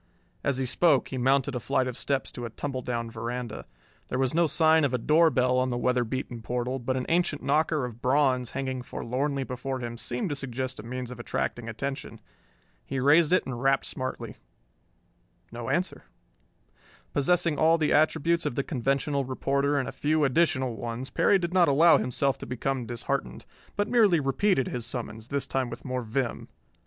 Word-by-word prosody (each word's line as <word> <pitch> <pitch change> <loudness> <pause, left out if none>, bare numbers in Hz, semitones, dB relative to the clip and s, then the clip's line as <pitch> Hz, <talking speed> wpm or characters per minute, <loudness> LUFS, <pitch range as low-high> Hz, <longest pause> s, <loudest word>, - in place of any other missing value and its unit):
As 140 -2 0
he 130 - -1
spoke 145 +2 +3
he 130 - -4
mounted 135 +1 +2
a 125 - -2
flight 130 +2 0
of 125 -2 -4
steps 135 +1 -2
to 120 - -6
a - - -4
tumbledown 120 -2 -4
veranda. 120 +1 -5 0.4
There 125 - -2
was 130 -1 +1
no 170 +1 +3
sign 160 0 +4
of 135 -3 +1
a - - +2
door 160 +7 +4
bell 125 -2 +2
on 130 0 +1
the 120 - -2
weather 125 0 +1
beaten 120 0 -4
portal, 125 +3 -2
but 130 +2 -2
an 125 - -2
ancient 170 -3 +1
knocker 155 -3 +1
of 120 -1 -9
bronze 130 -2 +2
hanging 130 -1 -3
forlornly 135 +3 -2
before 130 +1 -4
him 120 -1 -5
seemed 125 +9 -2
to 145 - -2
suggest 130 -1 -3
a - - -7
means 125 +1 -5
of 125 - -9
attracting 120 0 -3
attention. 135 0 -5 0.6
He 135 - -4
raised 150 +5 +5
it 185 - +3
and 125 -2 -5
rapped 135 0 +2
smartly. 130 0 -5 1.1
No 120 0 -6
answer. 180 0 -1 1.1
Possessing 165 +1 +2
all 165 +1 +5
the 155 -2 +1
attributes 165 +2 +2
of - - -3
the 140 - 0
conventional 140 +1 0
reporter 140 +2 0
and 135 - -1
a - - -4
few 155 +1 +1
additional 130 -4 +2
ones, 120 +2 -5
Perry 200 - +4
did 175 -1 -3
not 180 -2 +5
allow 160 +4 +6
himself 135 +2 0
to - - -8
become 130 0 -2
disheartened, 120 +4 -3 0.3
but 205 0 0
merely 210 -9 +4
repeated 140 +2 +1
his 125 -2 -4
summons, 115 -2 -5
this 140 0 -1
time 130 -2 -1
with - - -9
more 130 -1 -2
vim. 120 +2 -3
130 Hz, 185 wpm, -27 LUFS, 125-145 Hz, 1.1 s, allow